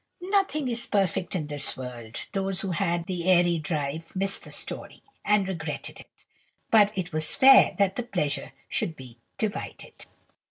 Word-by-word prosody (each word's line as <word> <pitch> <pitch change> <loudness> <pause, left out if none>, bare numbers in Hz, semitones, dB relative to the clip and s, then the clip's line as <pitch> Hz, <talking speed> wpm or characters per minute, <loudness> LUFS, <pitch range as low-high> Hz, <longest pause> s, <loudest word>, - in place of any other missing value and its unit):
Nothing 390 -8 +1
is 235 -1 -1
perfect 190 -2 0
in 160 -4 -2
this 145 -1 +1
world. 120 -3 -7
Those 195 -1 +1
who 195 - -3
had 170 0 -1
the 175 -2 -4
airy 175 -2 +4
drive 155 +1 -4
missed 195 +1 -1
the - - -11
story, - - -5 0.2
and 205 -2 +2
regretted 160 -5 -5
it; - - -18 0.5
but 210 -2 +6
it 180 -3 -3
was 155 0 +2
fair 270 0 +7
that 195 -2 +1
the - - 0
pleasure 180 -12 -2 0.2
should 165 - -2
be 125 -4 -13 0.2
divided. 215 -2 -5
180 Hz, 160 wpm, -26 LUFS, 155-200 Hz, 0.5 s, fair